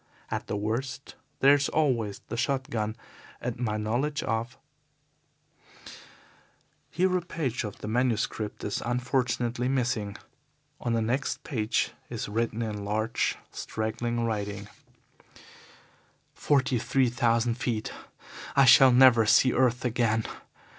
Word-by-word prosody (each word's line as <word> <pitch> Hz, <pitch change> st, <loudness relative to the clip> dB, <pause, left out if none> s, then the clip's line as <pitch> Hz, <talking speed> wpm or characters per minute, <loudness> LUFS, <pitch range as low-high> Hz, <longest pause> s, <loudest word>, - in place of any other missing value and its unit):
At -, -, -3 dB
the -, -, -2 dB
worst 125 Hz, +6 st, -3 dB, 0.3 s
there 140 Hz, +1 st, +7 dB
is 145 Hz, 0 st, +2 dB
always 120 Hz, -10 st, 0 dB
the -, -, -5 dB
shot 135 Hz, +2 st, -1 dB
gun 110 Hz, -1 st, -2 dB, 0.4 s
and 125 Hz, -1 st, -3 dB
my 110 Hz, -3 st, -1 dB
knowledge 120 Hz, +8 st, -1 dB
of 115 Hz, +3 st, -2 dB, 0.9 s
..." 155 Hz, -, -21 dB
Here 185 Hz, +2 st, +1 dB
a 180 Hz, -, +1 dB
page 150 Hz, -9 st, -3 dB
of 105 Hz, -2 st, -6 dB
the -, -, -5 dB
manuscript 110 Hz, -2 st, -1 dB
is 105 Hz, -, -2 dB
unfortunately 125 Hz, 0 st, -1 dB
missing. 120 Hz, -6 st, -1 dB, 0.6 s
On 120 Hz, -, -1 dB
the 115 Hz, -1 st, +1 dB
next 130 Hz, +5 st, -2 dB
page 110 Hz, -7 st, -1 dB, 0.2 s
is -, -, -4 dB
written, 115 Hz, +2 st, -1 dB
in 105 Hz, -2 st, -4 dB
large, 110 Hz, +2 st, -1 dB
straggling 120 Hz, +2 st, -3 dB
writing: 105 Hz, -2 st, -3 dB, 1.6 s
"Forty 130 Hz, -3 st, +1 dB
three 130 Hz, +2 st, +2 dB
thousand 115 Hz, 0 st, +1 dB
feet. 115 Hz, -4 st, -2 dB, 0.6 s
I 140 Hz, -1 st, +6 dB
shall 130 Hz, +1 st, +8 dB
never 125 Hz, -3 st, +6 dB
see 130 Hz, +3 st, +5 dB
earth 125 Hz, -1 st, +2 dB
again. 115 Hz, -2 st, +1 dB
120 Hz, 125 wpm, -27 LUFS, 110-130 Hz, 1.6 s, shall